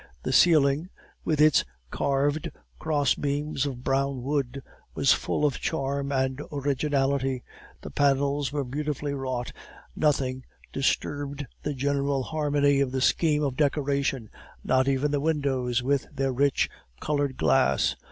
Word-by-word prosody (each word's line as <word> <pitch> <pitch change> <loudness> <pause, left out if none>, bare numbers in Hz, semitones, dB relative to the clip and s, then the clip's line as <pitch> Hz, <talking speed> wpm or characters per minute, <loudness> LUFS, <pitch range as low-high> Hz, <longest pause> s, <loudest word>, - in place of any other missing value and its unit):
The - - -1
ceiling, 155 0 +4 0.3
with 155 -2 0
its 155 -1 +5 0.3
carved 145 +2 0 0.3
cross 145 -4 +1
beams 145 0 -2
of 125 -3 -6
brown 135 -1 0
wood, 140 -1 -2 0.3
was - - +4
full 150 - -1
of 145 - 0
charm 140 -2 -2
and 130 0 0
originality; 140 -2 0 0.4
the - - -8
panels 140 -1 +1
were 145 -1 -1
beautifully 145 +2 -3
wrought; 130 -3 -3 0.4
nothing 130 -4 0 0.3
disturbed 145 +1 -1 0.2
the 145 -1 -3
general 140 0 0
harmony 145 -1 +1
of 135 -2 +1
the 130 - -1
scheme 150 +2 +2
of 135 -3 -1
decoration, 140 -4 0 0.3
not 130 +1 +2
even 140 +2 +1
the 145 -1 0
windows 135 -6 0
with 140 +1 0
their 135 -2 -1
rich 140 +2 +2 0.3
colored 145 -3 -1
glass. 80 - +2
140 Hz, 130 wpm, -26 LUFS, 135-145 Hz, 0.4 s, its